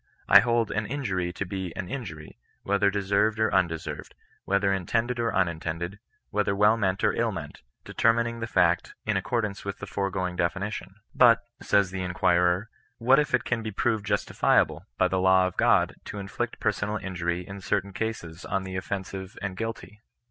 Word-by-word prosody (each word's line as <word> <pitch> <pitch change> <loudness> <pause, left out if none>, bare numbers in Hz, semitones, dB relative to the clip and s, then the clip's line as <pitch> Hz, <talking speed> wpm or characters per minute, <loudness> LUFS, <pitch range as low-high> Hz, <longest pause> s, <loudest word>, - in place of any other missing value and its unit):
I 100 - +9
hold 115 0 +1
an 110 0 -1
injury 100 -9 -2
to 100 - -4
be 95 -1 -4
an 95 - -4
inmry^ 90 - -7 0.3
whether 100 0 +2
deserved 100 +2 +1
or 110 0 +1
undeserved, 85 -4 -1 0.3
whether 100 0 +2
intended 115 +6 -1
or 115 -1 +1
unintended, 85 +1 -2 0.3
whether 105 -1 +1
well 105 +2 +5
meant 95 -4 -1
or - - +3
ill - - 0
meant, - - -7 0.2
determining 115 +1 +1
the 115 - -3
fact 90 -4 +2
in - - 0
accord 120 -3 0
ance 100 -1 -6
with 100 0 -4
the - - -7
foregoing 95 -2 -2
definition. 95 +3 -2 0.2
But, 115 -5 +6 0.2
says 100 -2 +2
the 95 -1 -4
in 90 -1 -4
quirer 90 +4 +2
— - - -36
" - - -47
what 130 +5 +5
if 150 -3 +2
it 130 - -1
can 115 -2 -1
be 110 - -4
proved 110 +1 0
justifiable, 100 0 +1
by - - +4
the 95 - 0
law 95 0 +5
of 95 - -3
God, - - +3
to - - -7
inflict 100 -1 -4
personal 105 +1 0
injury 90 -2 -3
in 100 0 -8
certain 100 +1 -1
cases 95 -7 -4
on 95 0 -2
the 95 0 -5
offensive 95 0 -5
and 100 -1 -4
guilty 115 0 -6
100 Hz, 185 wpm, -27 LUFS, 95-110 Hz, 0.3 s, I